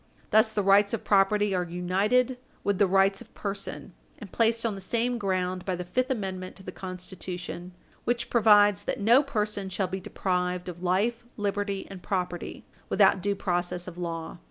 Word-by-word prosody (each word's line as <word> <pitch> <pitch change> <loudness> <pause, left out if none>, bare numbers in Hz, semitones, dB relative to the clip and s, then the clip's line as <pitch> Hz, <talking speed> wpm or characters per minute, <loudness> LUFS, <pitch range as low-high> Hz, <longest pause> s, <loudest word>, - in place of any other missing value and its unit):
Thus, 220 +1 +5
the 210 -2 0
rights 200 +2 +5
of - - -8
property 205 0 +3
are 180 - +1
united 195 +9 +1 0.2
with 200 -2 0
the 200 - +5
rights 195 +2 +3
of 230 - -13
person, 200 -1 -5 0.2
and 210 -9 -10
placed 230 0 +2
on 225 - +1
the 195 - -6
same 235 +5 0
ground 185 -2 -1
by 185 - -1
the 180 0 -5
fifth 255 +8 0
amendment 190 -6 -3
to 190 - -11
the 185 - -6
Constitution, 180 -1 -7 0.3
which 240 0 -1
provides 205 -3 +5
that - - -2
no 235 +6 +6
person 210 -7 -2
shall 190 +1 -1
be 190 +1 -4
deprived 180 -1 -2
of 175 -1 -7
life, 205 +7 +1
liberty, 205 -1 -2
and 195 -2 -9
property, 180 -3 -3 0.2
without 185 - +4
due 200 +2 0
process 175 -1 -2
of 180 - -7
law. 170 -1 -5
195 Hz, 180 wpm, -27 LUFS, 180-210 Hz, 0.3 s, no